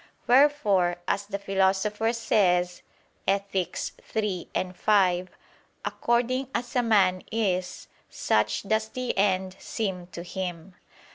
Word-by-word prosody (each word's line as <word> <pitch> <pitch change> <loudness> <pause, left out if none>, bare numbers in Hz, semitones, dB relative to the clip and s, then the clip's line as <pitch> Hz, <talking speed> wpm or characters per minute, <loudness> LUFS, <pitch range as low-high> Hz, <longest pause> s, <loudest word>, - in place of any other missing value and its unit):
Wherefore 240 -10 +4
as 200 +1 -1
the 200 -1 -3
Philosopher 195 +3 +1
says 180 -6 +1 0.5
(Ethic. 195 -2 0 0.4
iii, 210 -5 -1 0.3
5): 185 -2 +2 0.6
"According 250 +2 0
as 245 +1 -3
a 250 - +4
man 195 -6 +3
is, 185 -5 -1 0.2
such 105 0 0
does 220 +1 0
the 255 0 -3
end 190 -1 +1
seem 190 -5 -3
to 170 -1 -8
him." 180 0 -5
195 Hz, 110 wpm, -26 LUFS, 180-220 Hz, 0.6 s, Wherefore